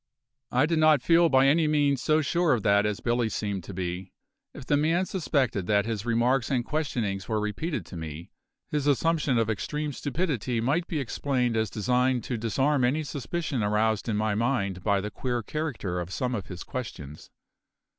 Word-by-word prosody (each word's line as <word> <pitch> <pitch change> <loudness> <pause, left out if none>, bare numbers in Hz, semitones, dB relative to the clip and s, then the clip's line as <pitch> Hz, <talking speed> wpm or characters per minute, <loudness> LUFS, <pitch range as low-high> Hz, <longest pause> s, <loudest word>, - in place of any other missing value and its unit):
I 130 +4 +3
did 160 0 +1
not 155 -4 +5
feel 170 0 +5
by 130 -1 +5
any 155 +3 +4
means 145 -3 +2
so 155 0 +2
sure 170 +1 +2
of 115 -5 -1
that 100 +1 +4
as 105 -1 -3
Billy 120 -1 +1
seemed 100 -4 -3
to 100 - -8
be. 90 0 -4 0.4
If 140 - -10
the 145 - +2
man 165 +5 +2
suspected 130 - -1
that 100 -1 +3
his 115 -1 -3
remarks 120 +2 +2
and 125 -3 0
questionings 120 -11 -2
were 110 -1 +1
repeated 105 - -3
to - - -10
me, 80 +1 -7 0.4
his 150 -1 -1
assumption 150 -2 +2
of 115 -1 +2
extreme 150 +7 -2
stupidity 135 - -2
might 145 +9 0
be 160 - -2
explained 125 -2 -1
as 110 -2 +1
designed 125 +3 +1
to 125 - -3
disarm 135 +5 +1
any 140 +6 +1
suspicion 145 -1 -3
aroused 105 +1 +1
in 105 - 0
my 110 0 +1
mind 100 -5 -1
by 100 -2 +2
the 105 +2 -5
queer 120 -1 -2
character 120 - -3
of 90 +1 -5
some 125 +5 -2
of 100 -6 -4
his 90 -1 -7
questions. 75 - -7
125 Hz, 185 wpm, -27 LUFS, 105-145 Hz, 0.4 s, not